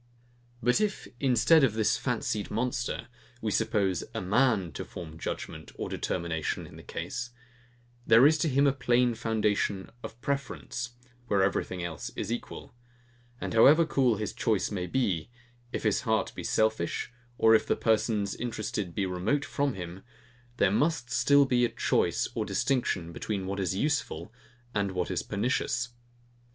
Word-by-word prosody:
But 125 - +3
if, 210 -2 -1
instead 135 +4 +5
of 115 -5 +3
this 110 -1 +2
fancied 105 -1 -2
monster, 120 +2 -2 0.3
we 110 -2 -2
suppose 100 -5 +1
a - - 0
MAN 105 -2 +2
to - - -5
form 85 -3 -8
a - - -12
judgement 80 - -6
or - - -4
determination 85 -3 -2
in - - -13
the - - -10
case, 120 - -5 0.8
there 115 +4 +7
is 155 +1 +5
to 160 - +1
him 140 +1 +3
a 140 - +4
plain 125 -2 +2
foundation 105 -3 0
of 115 - -9
preference, 135 -2 -3 0.3
where 100 -3 +3
everything 90 -1 -1
else 85 -4 -5
is 110 - -3
equal; 120 - -6 0.7
and - - -4
however 145 +9 +7
cool 130 -6 +2
his 105 0 -3
choice 110 -3 0
may 90 -3 -2
be, 95 -7 0 0.4
if - - -3
his - - +2
heart - - 0
be - - -7
selfish, 110 +1 0 0.2
or 110 0 +6
if 110 - +4
the - - +2
persons 110 -2 +1
interested 105 -6 -4
be 100 - 0
remote 95 +11 0
from 140 -2 -1
him; 90 0 -7 0.6
there - - +3
must 140 +1 +1
still 140 +2 +5
be 125 -2 +2
a 120 - +3
choice 115 - +1
or - - -1
distinction 95 -11 0
between 100 0 -3
what 100 +1 -3
is 95 -1 0
useful, 110 - -1 0.4
and 100 -2 0
what 90 -1 -1
is - - 0
pernicious. 120 +2 -1
110 Hz, 160 wpm, -29 LUFS, 95-125 Hz, 0.8 s, there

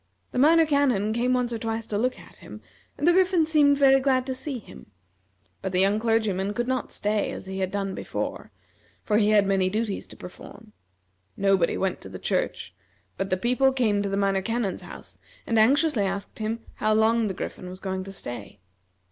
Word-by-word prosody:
The - - -2
Minor 325 +4 +6
Canon 260 -9 +1
came 245 +2 +1
once 245 -1 0
or 230 - -3
twice 225 0 -3
to 215 - -5
look 250 +3 0
at - - -16
him, - - -11 0.4
and 300 - 0
the 345 - +6
Griffin 365 -3 +3
seemed 295 -3 +4
very 270 -1 +6
glad 260 -1 +1
to 260 - -3
see 265 +1 -4
him; 215 - -13 0.7
but 190 -1 -4
the 180 - +2
young 200 +3 +3
clergyman 215 -3 0
could 240 +2 -1
not 260 -1 -2
stay 210 0 -1
as - - -5
he 190 0 -5
had 190 -1 -1
done 195 0 -3
before, - - -5 0.5
for 210 - +1
he 210 -1 +3
had 210 -2 +4
many 190 -1 +2
duties 215 0 -2
to - - -12
perform. 210 +4 -12 0.6
Nobody 195 -3 +2
went 190 -2 -2
to 95 - -10
the 95 - -7
church, 90 - -2 0.4
but 195 0 -3
the 185 - +1
people 250 +6 +2
came 220 -6 +1
to 200 - -2
the 195 - -1
Minor 195 -1 +1
Canon's 225 -1 -2
house, - - -11 0.3
and 225 -1 +1
anxiously 275 0 +3
asked 195 +3 -4
him 220 +1 -3 0.2
how 215 0 +2
long 225 +1 +3
the 190 - -4
Griffin 180 0 -6
was 185 +1 -9
going 190 -1 -3
to 195 - -8
stay. 120 - -8
215 Hz, 205 wpm, -25 LUFS, 195-255 Hz, 0.7 s, Minor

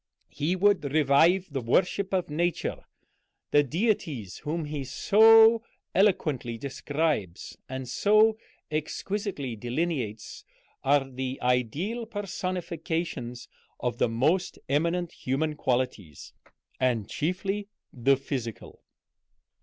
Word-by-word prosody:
He 160 +6 -1
would 200 -2 +3
revive 155 +5 +4
the 135 - -1
worship 185 +10 +1
of 185 -2 0
Nature. 170 +3 -1 0.7
The 145 - +6
deities 150 - -1
whom 160 +2 -3
he 150 -2 -4
so 220 - +6 0.3
eloquently 155 - +1
describes 140 - -2
and 130 0 -5
so 215 - +3 0.3
exquisitely 155 - -3
delineates 120 -2 -3 0.4
are 140 0 +3
the 130 0 -4
ideal 145 - 0
personifications 170 - -4 0.3
of 120 -1 -2
the - - +3
most 155 +11 +1
eminent 170 +5 0
human 150 +3 -2
qualities, 120 - -2 0.5
and 120 -5 +1
chiefly 195 - -2 0.3
the 135 +2 +3
physical. 125 -5 -6
150 Hz, 100 wpm, -27 LUFS, 125-185 Hz, 0.7 s, The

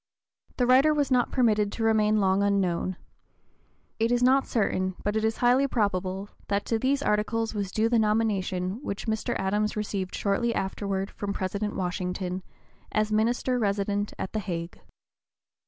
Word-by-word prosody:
The 250 - +2
writer 270 +5 +5
was 285 -2 0
not 250 -1 +3
permitted 215 -5 +2
to 225 - -3
remain 215 -1 +3
long 190 0 +2
unknown. 185 -2 0 1.0
It 225 +1 +2
is 245 0 +2
not 265 +2 +4
certain, 185 -4 0
but 205 +1 -1
it - - +3
(p. - - 0
019) - - +5
is 220 - -2
highly 250 +3 +4
probable, 195 -4 -1 0.2
that 200 0 0
to 225 - 0
these 275 +3 +1
articles 225 +2 0
was 200 -3 -3
due 220 +2 +1
the 235 0 +3
nomination 210 -2 0
which 200 -8 -5
Mr. 220 -1 -1
Adams 210 +2 0
received 200 -3 -3
shortly 230 +4 0
afterward 195 0 -2
from 200 -1 -4
President 200 +2 -3
Washington, 180 0 -3 0.5
as 215 0 0
Minister 240 +3 +1
Resident 205 -1 0
at - - -5
the 215 - 0
Hague. 170 -4 -5
210 Hz, 165 wpm, -27 LUFS, 195-225 Hz, 1.0 s, writer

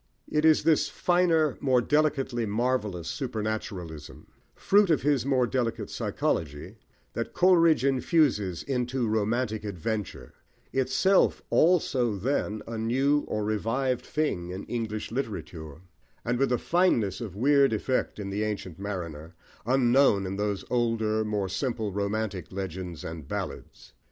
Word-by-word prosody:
It 150 +1 +1
is 155 -1 +5
this 160 -1 +3
finer, 165 -5 +2
more 130 -3 +3
delicately 135 -4 +1
marvellous 105 -6 -1
supernaturalism, 105 - -5 0.3
fruit 200 -1 +3
of 150 -7 +2
his 140 -3 +1
more 130 -3 +3
delicate 120 -2 -2
psychology, 75 -3 -2 0.4
that - - -4
Coleridge 170 -6 +4
infuses 130 - +1
into 125 -2 -1
romantic 110 +1 0
adventure, 100 - -4 0.4
itself 135 +9 +2
also 135 - +3
then 110 -1 -2
a 115 -1 -4
new 135 +6 +1
or 105 - -2
revived 115 +5 -1
thing 95 - -1
in 95 +2 -6
English 110 -3 -4
literature; 85 - -5 0.4
and 120 +1 0
with 135 -2 +2
a 125 - +3
fineness 120 - +1
of 105 -6 -6
weird 140 +4 +4
effect 120 +4 -1
in 100 -2 -5
The 100 +2 -2
Ancient 100 -5 -4
Mariner, 85 -5 -6 0.3
unknown 125 -5 +4
in 95 +1 -3
those 105 -1 -2
older, 115 -3 +1
more 105 -2 -1
simple, 110 +1 -2
romantic 100 -2 -3
legends 95 -3 -5
and 80 -3 -7
ballads. - - -6
115 Hz, 130 wpm, -27 LUFS, 100-135 Hz, 0.4 s, is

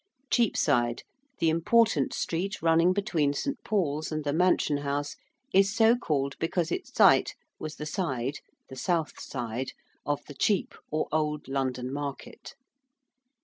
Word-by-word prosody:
~Cheapside~: 135 - +2 0.3
the 165 - +2
important 165 - +3
street 185 +4 -2
running 165 +2 +4
between 175 -8 +1
St. 280 - -3
Paul's 155 -8 -1
and 155 -1 -2
the 145 -1 -1
Mansion 170 -3 +2
House 145 0 -2 0.4
is 195 +2 +4
so 225 +1 +5
called 140 - -1
because 170 0 -1
its 370 - -3
site - - +5 0.2
was 155 0 -6
the 150 - -6
side 140 -5 -2 0.3
the 130 - -10
south 165 +3 -1
side 125 0 -4 0.3
of 145 -1 -2
the 145 - -10
Chepe, 200 +6 0
or 155 0 -1
old 150 -1 -1
London 130 -1 -2
market. 140 -1 -6
155 Hz, 140 wpm, -28 LUFS, 140-180 Hz, 0.4 s, so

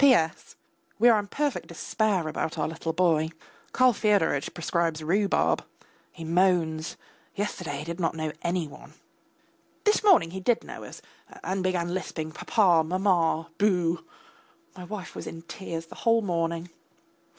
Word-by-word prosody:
P.S. 235 - +3 0.4
We 240 +3 +6
are 225 -2 +5
in 205 - -5
perfect 290 +4 -2
despair 205 -7 0
about 155 +1 -3
our 150 - 0
little 160 +1 -3
boy. 160 -2 +2 0.4
Karl 255 -1 +5
Fyodoritch 200 -10 +2
prescribes 165 -2 -1
rhubarb. 195 +5 +2 0.5
He 165 - -9
moans. 165 -2 +1 0.4
Yesterday 185 -7 -3
he 145 - -5
did 170 +3 -5
not 165 -2 0
know 155 -1 -2
any 170 -2 -1
one. 145 - -14 0.9
This 420 +1 +3
morning 360 - +5
he 190 - -5
did 225 +5 +1
know - - -8
us, - - -10 0.4
and 190 +1 -1
began 180 -2 0
lisping 160 -4 -4
papa, 175 -2 +3
mamma, 170 -2 +1
boo.... 180 -5 +2 0.7
My 180 -1 -8
wife 190 -1 -7
was - - -6
in 165 0 -7
tears 165 -2 -6
the - - -13
whole 230 -1 +3
morning. 170 -2 -1
175 Hz, 150 wpm, -27 LUFS, 165-200 Hz, 0.9 s, We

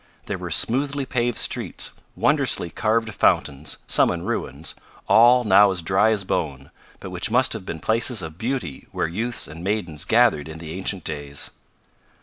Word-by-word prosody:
There - - -4
were - - -6
smoothly 140 +3 +3
paved 120 -2 -1
streets; - - 0 0.2
wondrously 85 - +1
carved 110 0 0
fountains, 70 -5 0
some - - +3
in 85 -1 -3
ruins, 85 - -4 0.3
all 120 +2 +6
now 105 -1 +6
as 90 -3 -2
dry 95 +5 +3
as 105 -3 0
bone, 70 -7 -3 0.3
but - - -8
which - - -2
must 125 +1 +3
have 105 -4 -7
been 80 - -5
places 110 +2 +1
of 80 +1 -9
beauty 120 - -4
where - - -1
youths 115 +8 -2
and 80 +3 -10
maidens 90 -6 -1
gathered 110 -9 +3
in 80 0 -8
the 80 -1 -8
ancient 95 -1 -3
days. 75 -2 -3
95 Hz, 165 wpm, -22 LUFS, 80-115 Hz, 0.3 s, all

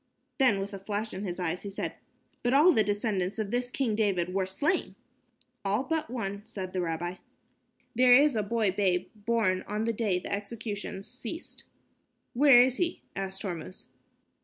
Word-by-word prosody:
Then, 250 -7 +4
with 195 +1 -4
a 195 - -5
flash 210 +2 -3
in 190 - -5
his 180 -2 -4
eye 175 -2 0
he 200 - -7
said, 195 - -4 0.5
"But 245 +2 +2
all 310 +6 +7
the 220 - +4
descendants 205 -2 -1
of 210 -2 -2
this 245 0 0
King 250 -3 0
David 190 -5 0
were 190 -1 0
slain." 295 - 0 0.7
"All 205 +5 +1
but 320 +1 -2
one," 200 -5 -4
said 190 -4 -7
the 185 - 0
rabbi. 175 +1 -3 0.8
"There 250 +1 +7
is 285 0 +5
a 215 - +2
boy 215 -1 +1
babe, 185 -2 0
born 210 -4 0
on 210 +1 -2
the 230 0 0
day 210 -4 0
the 180 - -3
executions 205 -1 -5
ceased." 250 +7 -7 0.7
"Where 270 -1 +7
is 255 +1 +2
he?" 350 -1 -1
asked 190 0 -4
Hormuz. 180 -2 -6
210 Hz, 175 wpm, -29 LUFS, 190-240 Hz, 0.8 s, all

